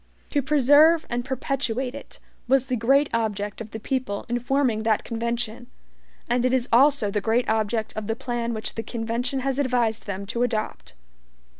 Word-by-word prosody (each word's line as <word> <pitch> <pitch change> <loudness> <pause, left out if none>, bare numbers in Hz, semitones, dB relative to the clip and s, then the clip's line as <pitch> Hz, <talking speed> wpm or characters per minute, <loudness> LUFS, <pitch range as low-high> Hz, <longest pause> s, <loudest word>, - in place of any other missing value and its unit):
To 290 - +2
preserve 300 +4 +5
and 240 0 -1
perpetuate 260 -1 -2
it 280 - -10 0.3
was 265 0 +3
the 255 -1 -1
great 270 +5 +3
object 210 -2 -2
of 220 - -7
the 220 - -7
people 225 -4 -3
in 240 0 0
forming 245 -3 +1
that 220 -1 +1
convention, 235 0 -3 0.6
and 245 +1 +1
it 255 +1 +3
is 250 -1 0
also 265 -4 +4
the 210 0 -1
great 230 +4 +1
object 220 0 0
of 215 -1 -4
the 225 - -1
plan 235 -1 -3
which 215 - -4
the 225 - -4
convention 240 +4 -2
has 270 +1 -1
advised 240 -5 0
them 200 0 -4
to 230 +4 -3
adopt. 220 - -2
240 Hz, 175 wpm, -24 LUFS, 220-265 Hz, 0.6 s, preserve